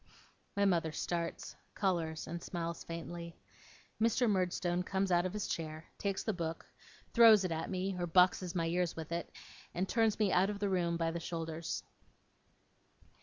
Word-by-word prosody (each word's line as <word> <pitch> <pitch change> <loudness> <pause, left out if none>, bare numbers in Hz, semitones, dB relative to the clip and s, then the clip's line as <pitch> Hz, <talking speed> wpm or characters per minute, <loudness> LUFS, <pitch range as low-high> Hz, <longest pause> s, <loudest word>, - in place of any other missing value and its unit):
My 200 - +4
mother 170 -4 +2
starts, 170 +2 -3 0.2
colours, 165 -5 0
and 170 +1 -5
smiles 170 -1 -4
faintly. 170 0 -6 0.6
Mr. 230 +2 +3
Murdstone 180 -3 +1
comes 190 +1 -1
out 175 +1 +4
of 185 - -7
his 210 -1 -2
chair, 155 0 -4
takes 200 -1 -1
the 220 - 0
book, 165 -2 -4 0.5
throws 225 -4 +8
it 180 - -2
at 160 0 -2
me 190 0 -1
or 175 - -1
boxes 180 +1 +4
my 165 -2 +1
ears 175 0 0
with 160 0 -7
it, 170 0 -3 0.4
and 185 +2 0
turns 225 -1 +2
me 210 -3 +2
out 185 +3 +4
of 210 - -3
the 200 0 -1
room 170 -3 +1
by 165 -1 0
the 170 - -3
shoulders. 165 -1 -4
175 Hz, 170 wpm, -34 LUFS, 165-195 Hz, 0.6 s, throws